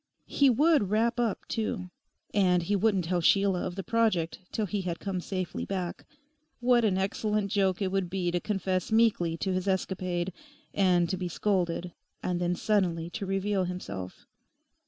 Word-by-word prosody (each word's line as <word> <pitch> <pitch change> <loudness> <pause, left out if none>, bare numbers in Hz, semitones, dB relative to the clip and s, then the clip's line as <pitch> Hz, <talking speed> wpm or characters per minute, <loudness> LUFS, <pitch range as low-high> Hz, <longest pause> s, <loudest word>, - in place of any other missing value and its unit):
He 280 -1 +3
would 285 - +3
wrap 230 +3 +1
up 230 -4 -1
too. 215 -5 -3 0.4
And 180 -3 +3
he 205 +4 0
wouldn't 195 -3 +2
tell 175 +1 0
Sheila 195 +1 +3
of 180 - -6
the 195 - -4
project 210 -6 +1
till 215 - -1
he 200 +1 -2
had 175 -2 -3
come 190 -3 -3
safely 185 -1 -3
back. 185 -3 -4 0.5
What 245 -1 +4
an 200 -4 +2
excellent 200 +1 -1
joke 195 -1 +1
it 190 - -1
would 190 -2 0
be 180 -1 -1
to 175 - 0
confess 190 -1 -2
meekly 215 -7 +3
to 190 +2 -1
his 185 +1 -2
escapade, 185 -2 -1 0.4
and 180 -3 +3
to 185 - -2
be 180 0 -3
scolded, 175 -2 -1 0.3
and 180 -1 -1
then 175 0 +1
suddenly 175 -5 0
to 200 -1 -4
reveal 195 0 0
himself. 100 - -6
190 Hz, 170 wpm, -29 LUFS, 180-210 Hz, 0.5 s, What